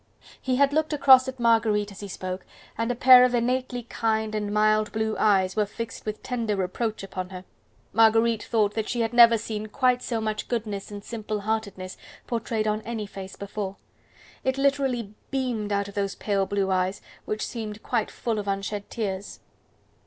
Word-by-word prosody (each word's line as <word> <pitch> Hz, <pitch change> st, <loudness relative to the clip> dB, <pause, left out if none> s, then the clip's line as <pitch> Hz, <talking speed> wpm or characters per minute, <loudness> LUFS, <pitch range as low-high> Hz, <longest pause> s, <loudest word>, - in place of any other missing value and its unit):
He 255 Hz, -1 st, 0 dB
had 280 Hz, +2 st, +3 dB
looked 310 Hz, +1 st, +1 dB
across 265 Hz, -3 st, +7 dB
at 260 Hz, -1 st, -6 dB
Marguerite 220 Hz, -3 st, +2 dB
as 200 Hz, -, -11 dB
he 205 Hz, -, -6 dB
spoke, 185 Hz, 0 st, -5 dB, 0.3 s
and 230 Hz, +2 st, -1 dB
a -, -, -2 dB
pair 250 Hz, +1 st, +8 dB
of 250 Hz, -1 st, +3 dB
innately 250 Hz, +1 st, -1 dB
kind 220 Hz, -1 st, -1 dB
and 210 Hz, -1 st, -2 dB
mild 215 Hz, 0 st, +3 dB
blue 220 Hz, 0 st, -1 dB
eyes 190 Hz, -3 st, +3 dB
were 210 Hz, -1 st, +1 dB
fixed 230 Hz, +1 st, -7 dB
with 215 Hz, 0 st, -4 dB
tender 230 Hz, -4 st, -1 dB
reproach 200 Hz, +3 st, -2 dB
upon 185 Hz, -1 st, -5 dB
her. 185 Hz, -1 st, -9 dB, 0.5 s
Marguerite 225 Hz, +1 st, +4 dB
thought 210 Hz, -3 st, +1 dB
that 220 Hz, -1 st, -2 dB
she 240 Hz, -, 0 dB
had 225 Hz, +1 st, -1 dB
never 235 Hz, -1 st, +8 dB
seen 215 Hz, 0 st, -4 dB
quite 250 Hz, +2 st, +2 dB
so 230 Hz, -2 st, -2 dB
much 215 Hz, -1 st, -3 dB
goodness 210 Hz, -4 st, -3 dB
and 205 Hz, -1 st, -8 dB
simple 215 Hz, -2 st, -4 dB
heartedness 200 Hz, -3 st, -3 dB, 0.3 s
portrayed 230 Hz, -2 st, -2 dB
on 215 Hz, 0 st, 0 dB
any 225 Hz, -1 st, -4 dB
face 195 Hz, -1 st, -9 dB
before. 200 Hz, -1 st, -5 dB, 0.7 s
It 260 Hz, 0 st, 0 dB
literally 270 Hz, -6 st, 0 dB, 0.2 s
beamed 245 Hz, -6 st, -2 dB
out 200 Hz, 0 st, 0 dB
of 200 Hz, -, -10 dB
those 200 Hz, -1 st, -2 dB
pale 195 Hz, -2 st, 0 dB
blue 195 Hz, -1 st, 0 dB
eyes, 185 Hz, +1 st, 0 dB, 0.2 s
which 215 Hz, 0 st, -2 dB
seemed 220 Hz, -2 st, -6 dB
quite 220 Hz, -, 0 dB
full 225 Hz, -3 st, -2 dB
of 205 Hz, -, -5 dB
unshed 200 Hz, +1 st, -3 dB
tears. 200 Hz, -4 st, -4 dB
215 Hz, 180 wpm, -26 LUFS, 200-235 Hz, 0.7 s, pair